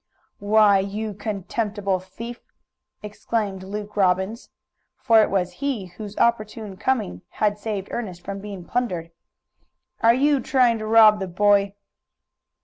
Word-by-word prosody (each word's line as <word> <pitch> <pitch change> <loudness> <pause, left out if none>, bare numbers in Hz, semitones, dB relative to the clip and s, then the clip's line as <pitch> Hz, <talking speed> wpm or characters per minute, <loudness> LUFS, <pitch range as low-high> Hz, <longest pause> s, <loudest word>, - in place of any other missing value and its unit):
"Why, 205 -1 +4
you 205 +2 -3
contemptible 205 -1 -2
thief!" 230 +6 -9 0.6
exclaimed 210 -2 -3
Luke 205 +2 -7
Robbins 190 +3 0 0.5
for 230 -4 +5
it - - +2
was 185 -2 0
he 270 -9 -2
whose 200 +3 -10
opportune 215 -3 0
coming 185 - -1
had 210 -1 0
saved 205 -3 -4
Ernest 185 -7 -5
from 200 0 -5
being 195 -3 -8
plundered. 180 -10 -2 0.9
"Are 230 +1 +5
you 285 +2 +3
trying 250 -3 +2
to 215 - -5
rob 215 -1 +6
the 190 - -3
boy?" 200 +2 +2
210 Hz, 130 wpm, -23 LUFS, 195-225 Hz, 0.9 s, rob